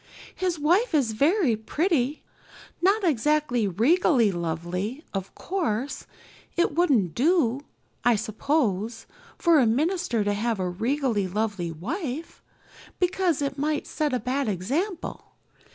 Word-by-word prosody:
His 365 -3 -1
wife 345 +7 +2
is 265 -7 +2
very 290 - +2
pretty. 295 - 0 0.6
Not 395 +4 +3
exactly 295 - +2
regally 235 - +3
lovely, 175 - -3
of 195 -1 -5
course 285 - -2 0.5
it 345 - +2
wouldn't 270 - +2
do, 270 - +2 0.4
I 240 -1 +4
suppose, 220 -1 -1 0.3
for 335 -4 +4
a 250 - +4
minister 275 - +1
to 205 0 0
have 220 +1 -1
a 185 - 0
regally 225 +2 0
lovely 200 -3 -2
wife, 280 - -5 0.6
because 360 -4 +1
it 275 0 -3
might 300 +1 0
set 300 -2 -1
a 250 - 0
bad 260 +3 -1
example. 280 - -3
260 Hz, 120 wpm, -26 LUFS, 215-320 Hz, 0.6 s, I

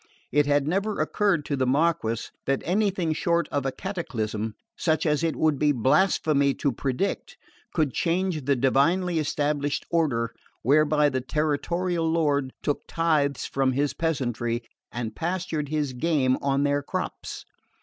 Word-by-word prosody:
It 145 +1 +3
had 145 -1 +2
never 200 +5 0
occurred 170 0 +1
to 145 - -1
the 130 -1 0
Marquess 135 -5 +1 0.2
that 135 0 0
anything 185 -3 +1
short 170 +2 +1
of 140 -2 -1
a - - 0
cataclysm 110 - -4 0.2
such 160 -2 0
as 150 0 +1
it 165 -2 +1
would 155 -3 +1
be 150 -1 +4
blasphemy 140 - +2
to 140 - 0
predict 135 - -2 0.4
could 155 -6 +1
change 175 -4 0
the 140 0 +3
divinely 160 +7 +2
established 145 -1 -1
order 130 -9 +1 0.3
whereby 150 +2 +4
the 130 -1 -2
territorial 160 +5 0
lord 145 -5 +1
took 145 - -2
tithes 150 -5 +1
from 135 -1 +1
his 140 +2 0
peasantry 120 -7 -1 0.3
and 115 -2 -4
pastured 165 -4 -2
his 150 -3 -1
game 130 -2 +2
on 140 0 +1
their 145 0 +1
crops. - - -5
145 Hz, 145 wpm, -26 LUFS, 135-165 Hz, 0.4 s, be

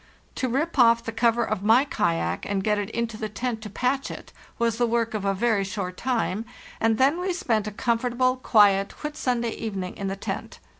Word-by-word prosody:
To 255 - -2
rip 290 +5 -1
off 230 -1 +6
the 225 - -4
cover 230 +1 +2
of 215 -3 -2
my 225 +6 +5
kayak 85 - -1
and 195 -1 0
get 210 0 +1
it 205 0 -3
into 230 -1 -3
the 215 0 -4
tent 230 +1 -3
to 215 - -7
patch 255 +6 -1
it - - -9 0.2
was 230 0 0
the 240 - +3
work 230 0 0
of 210 -2 -3
a 195 0 +1
very 215 -1 +1
short 190 -1 -4
time, 225 -4 -1 0.4
and 225 -1 +2
then 280 +7 +3
we 370 +1 -1
spent 220 - 0
a - - -3
comfortable, 245 +4 +1
quiet 205 -4 +3
Whit 300 0 -4
sunday 240 -5 -1
evening 195 -6 -5
in 200 - -4
the 195 - -2
tent. 195 - -5
225 Hz, 210 wpm, -25 LUFS, 205-245 Hz, 0.4 s, off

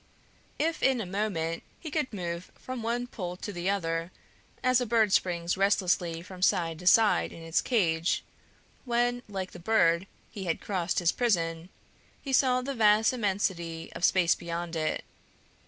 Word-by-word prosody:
If 325 +2 -1
in 265 -2 +3
a 220 - -3
moment 180 -4 -2 0.2
he 315 - -7
could 300 -3 -1
move 175 -3 -5
from 255 -2 -6
one 235 +2 -1
pole 180 -7 -6
to 205 - -6
the 175 +1 -2
other 165 -3 -1 0.5
as 255 0 +4
a 245 - -1
bird 220 -3 +3
springs 175 -1 +1
restlessly 185 -4 +1
from 185 0 -11
side 165 -3 +2
to 180 - -6
side 220 +2 +5
in 165 - -10
its 165 0 +1
cage, 170 -8 +1 0.6
when, 245 0 +1
like 190 -2 -4
the 175 - -10
bird, 170 -2 +3 0.2
he 200 -4 -6
had 165 - -1
crossed 185 -3 -2
his 175 -1 +3
prison, 170 -7 0 0.5
he 275 - -5
saw 255 -1 +3
the 275 +2 -3
vast 220 -1 +4
immensity 190 -7 -2
of - - -8
space 180 -3 +4
beyond 170 0 -5
it. 155 -1 -1
190 Hz, 165 wpm, -29 LUFS, 170-230 Hz, 0.6 s, side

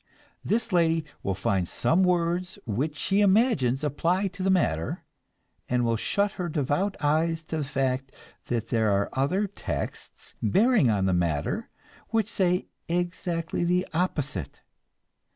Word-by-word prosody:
This 230 +1 0
lady 165 -2 +3 0.2
will 95 - -1
find 95 -2 0
some 170 +4 +2
words 180 0 +1
which 140 +8 -2
she 195 +6 +1
imagines 190 - +3
apply 170 +7 +1
to 185 +1 -9
the 190 - +1
matter, 85 - +1 0.7
and 125 -1 +2
will 115 0 +2
shut 200 - 0
her 175 - -2
devout 155 +7 0
eyes 160 +2 +1
to 160 0 -4
the 155 - -1
fact 135 -2 -1 0.3
that 115 -2 -2
there 110 -3 +2
are 100 0 +1
other 175 +10 +1
"texts," 200 - -6
bearing 205 - +4
on 100 -3 +2
the 95 - +2
matter, 85 -4 -1 0.4
which 225 -2 +1
say 180 -4 +1 0.2
exactly 175 -1 -1
the 180 +2 +1
opposite. 150 - -2
160 Hz, 140 wpm, -27 LUFS, 125-185 Hz, 0.7 s, bearing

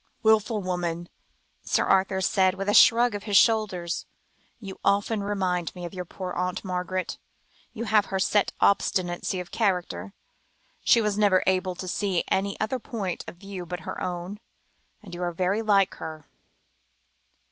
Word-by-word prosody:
"Wilful 220 -1 +3
woman," 175 -2 -3 0.5
Sir - - +1
Arthur 190 0 +2
said, 185 0 +2
with 195 +1 -4
a 205 - +2
shrug 235 +2 +6
of 205 0 -5
the 205 -2 -1
shoulders; 195 -7 +2 0.5
"you 195 -4 -9
often 205 +2 +1
remind 185 -4 -1
me 175 -1 -6
of 170 - -7
your 180 -1 -5
poor 185 +1 -6
Aunt 180 +2 -2
Margaret. 185 0 -3 0.5
You 230 - -5
have 210 -2 +3
her 195 - -2
set 200 +2 +2
obstinacy 185 -2 +1
of 180 - -7
character. 195 -1 -1 0.7
She 235 - +5
was 210 -1 0
never 200 -3 +4
able 185 -1 +1
to 185 - -7
see 190 -1 0
any 200 +1 0
other 235 +4 -1
point 205 -6 -4
of - - -8
view 195 -1 -7
but 175 +1 -6
her - - -6
own, 180 +2 -4 0.6
and 185 -4 -11
you 175 - -6
are 175 -1 -1
very 185 +5 0
like 200 -3 +3
her." 155 -1 -8
190 Hz, 160 wpm, -26 LUFS, 180-205 Hz, 0.7 s, shrug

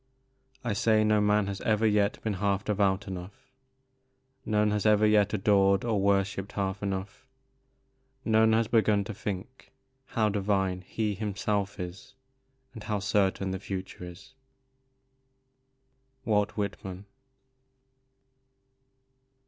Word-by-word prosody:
I 120 -4 -1
say 110 0 +3
no 105 -1 +3
man 105 0 +3
has 100 0 -5
ever 110 0 +1
yet 105 -1 +2
been 110 - -1
half 100 0 0
devout 100 -1 +1
enough; 95 +4 -9 0.9
None 105 -1 +2
has 105 -1 0
ever 110 0 +4
yet 105 -1 +4
adored 100 0 +3
or 110 -4 +1
worshipped 100 0 0
half 95 -1 -2
enough; 100 +5 -5 1.0
None 110 0 +4
has 115 0 +2
begun 110 -3 +3
to 110 - -6
think 105 +5 -7 0.4
how 110 -2 +1
divine 95 -2 0
he 105 +3 -2
himself 100 0 -2
is, 90 +1 -8 0.6
and 110 - -9
how 105 -1 -1
certain 95 -1 0
the 95 - -3
future 95 -2 -6
is." 90 +7 -11 1.9
Walt 105 -2 +1
Whitman. 95 -2 -4
100 Hz, 115 wpm, -28 LUFS, 95-105 Hz, 1.9 s, ever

